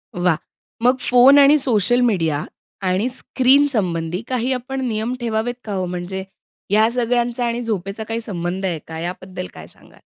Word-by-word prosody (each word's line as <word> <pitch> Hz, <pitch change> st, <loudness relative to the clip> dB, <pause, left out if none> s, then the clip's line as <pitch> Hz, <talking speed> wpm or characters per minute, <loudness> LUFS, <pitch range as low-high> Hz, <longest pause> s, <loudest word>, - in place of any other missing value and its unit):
वाह! 175 Hz, -3 st, +2 dB, 0.5 s
मग 250 Hz, +1 st, +4 dB
फोन 250 Hz, +3 st, +7 dB
आणि 285 Hz, +2 st, +7 dB
सोशल 240 Hz, -2 st, +2 dB
मीडिया 160 Hz, -7 st, 0 dB, 0.4 s
आणि 190 Hz, +6 st, +1 dB
स्क्रीनसंबंधी 225 Hz, -, +1 dB
काही 255 Hz, 0 st, -1 dB
आपण 265 Hz, +2 st, -4 dB
नियम 225 Hz, +2 st, -2 dB
ठेवावेत 235 Hz, 0 st, -1 dB
का 210 Hz, -, -5 dB
हो? 185 Hz, -1 st, -1 dB
म्हणजे 180 Hz, +2 st, -4 dB, 0.5 s
या 215 Hz, +2 st, +4 dB
सगळ्यांचा 240 Hz, 0 st, 0 dB
आणि 235 Hz, +1 st, -1 dB
झोपेचा 205 Hz, -1 st, -3 dB
काही 225 Hz, +1 st, -3 dB
संबंध 185 Hz, -2 st, -4 dB
आहे 170 Hz, -4 st, -1 dB
का? 160 Hz, 0 st, -6 dB
याबद्दल 185 Hz, +1 st, -6 dB
काय -, -, -11 dB
सांगाल? -, -, -19 dB
220 Hz, 155 wpm, -20 LUFS, 180-245 Hz, 0.5 s, फोन